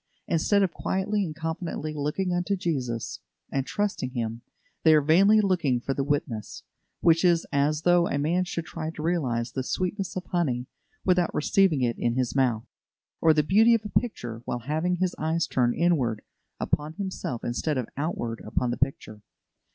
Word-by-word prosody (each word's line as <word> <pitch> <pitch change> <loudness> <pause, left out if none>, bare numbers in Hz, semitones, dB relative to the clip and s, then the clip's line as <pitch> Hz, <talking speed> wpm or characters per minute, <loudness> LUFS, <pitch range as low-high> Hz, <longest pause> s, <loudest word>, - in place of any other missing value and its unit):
Instead 200 +5 +2
of 180 -3 0
quietly 200 +2 -1
and 155 -4 -5
confidently 160 -1 -4
looking 150 +5 -1
unto 175 +3 0
Jesus, 130 - -3 0.3
and 135 -1 -1
trusting 205 -11 -1
Him, 115 -2 -4 0.4
they 160 -1 +6
are 150 - +5
vainly 195 +9 +5
looking 175 -11 +1
for 135 +3 -2
the 135 - -1
witness; 135 -7 -3 0.4
which 165 0 +4
is 170 -2 +3
as 150 +2 +1
though 175 -1 +4
a - - -1
man 165 +6 +1
should 170 -2 -4
try 160 -1 -5
to 155 -1 -7
realise 130 -9 0
the 130 - -2
sweetness 185 +7 -2
of 185 - -4
honey, 130 -9 -1 0.4
without 180 -2 +2
receiving 160 -3 +3
it 120 -1 0
in 120 0 0
his 125 -2 -1
mouth; 125 -4 +1 0.6
or 165 - +6
the 155 -1 +3
beauty 220 +8 +5
of 220 -2 -2
a - - -4
picture, 120 - -6
while 120 - -3
having 160 +5 0
his 185 0 0
eyes 160 +2 +1
turned 120 -2 +1
inward 135 -11 +1 0.4
upon 150 +1 -1
himself 185 - -4
instead 135 +5 -1
of 125 -3 -2
outward 125 -6 -3
upon 120 +3 -1
the 120 - -3
picture. 110 -5 -2
155 Hz, 175 wpm, -26 LUFS, 130-180 Hz, 0.6 s, they